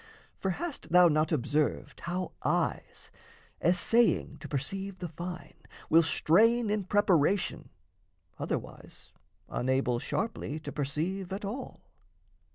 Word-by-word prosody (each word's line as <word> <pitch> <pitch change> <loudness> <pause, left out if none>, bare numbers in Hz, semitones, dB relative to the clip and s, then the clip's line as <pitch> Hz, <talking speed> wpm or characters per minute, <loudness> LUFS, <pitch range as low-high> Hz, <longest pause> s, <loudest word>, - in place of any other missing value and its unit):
For 190 - -1
hast 300 - -5
thou 180 0 +8
not 155 +1 +2
observed 150 +1 0
How 180 +1 -3
eyes, - - -1 0.5
essaying 180 -2 +3
to - - -8
perceive 190 +8 -4
the 180 - -5
fine, 175 +3 -7 0.4
Will 165 - +8
strain 215 +8 +3
in 210 -2 -1
preparation, 190 -2 +2 0.7
otherwise - - -6 0.4
Unable 125 -1 0
sharply 160 - -3
to - - -6
perceive 165 +7 -3
at 200 +2 -4
all? 235 +7 -6
180 Hz, 110 wpm, -30 LUFS, 150-200 Hz, 0.7 s, thou